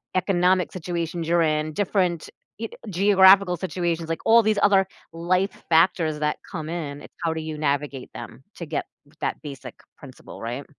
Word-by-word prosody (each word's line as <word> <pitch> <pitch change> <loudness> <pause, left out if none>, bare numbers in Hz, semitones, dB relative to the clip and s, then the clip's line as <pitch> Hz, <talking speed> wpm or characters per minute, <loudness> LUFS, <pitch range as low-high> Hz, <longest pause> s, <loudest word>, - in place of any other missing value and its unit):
economic 185 -1 +2
situations 170 -1 -4
you're 170 0 +3
in, 155 -1 +1
y - - -5
ge - - -15
different 185 -4 0 0.6
geographical 190 -1 +5
situations, 170 -2 -2
like 165 0 -3
all 230 +1 +7
these 215 -2 +1
other 195 -2 +4 0.2
life 180 +4 0 0.2
factors 165 -2 +3
that 150 0 0
come 160 -3 -5
in, 150 -4 -5
it's - - -14
how 165 -1 +1
do 160 - -4
you 155 -1 -6
navigate 140 -2 -2
them 120 +2 -9
to 170 - -7
get - - -3 0.2
g - - -23
that - - -1
basic 140 -4 -9 0.2
principle, - - -12
right? 120 +5 -5
170 Hz, 170 wpm, -24 LUFS, 155-185 Hz, 0.6 s, all